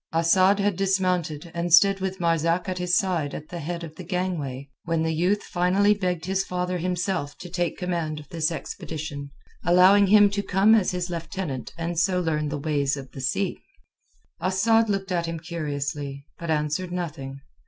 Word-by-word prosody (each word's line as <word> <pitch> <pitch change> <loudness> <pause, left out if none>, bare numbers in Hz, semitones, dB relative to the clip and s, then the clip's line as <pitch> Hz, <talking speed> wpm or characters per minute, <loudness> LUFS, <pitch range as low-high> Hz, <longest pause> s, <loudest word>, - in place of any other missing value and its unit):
Asad 185 +4 +4
had 200 -2 +1
dismounted, 180 -4 0
and 170 +1 -2
stood 195 +4 +6
with 190 0 -3
Marzak 170 0 +1
at 185 -1 -3
his 180 0 +2
side 175 -8 0
at 155 - -8
the 175 - -6
head 170 +2 -4
of 160 -2 -8
the 185 - -7
gangway 165 -7 -3 0.2
when 165 -1 0
the 160 0 0
youth 180 +6 +1
finally 190 +4 +2
begged 180 -5 -2
his 190 +1 0
father 180 -1 -2
himself 180 -4 -2
to 175 - -10
take 175 -1 -1
command 170 -4 -2
of 150 - -12
this 165 -1 0
expedition, 150 -3 -6 0.3
allowing 185 +4 +6
him 205 +1 +7
to 200 0 -1
come 200 +2 +4
as 215 -5 +4
his 180 0 -3
lieutenant 165 -4 -4
and 170 0 -2
so 180 +1 +2
learn 155 -3 -1
the 145 - -3
ways 145 -2 0
of 135 -1 -9
the 135 - -8
sea. 130 - -1 0.8
Asad 215 +5 +2
looked 195 -1 -1
at 170 -2 0
him 165 -1 -4
curiously, 145 -4 -4
but 170 - -6
answered 150 +3 -1
nothing. 150 -6 -5
175 Hz, 180 wpm, -25 LUFS, 155-185 Hz, 0.8 s, him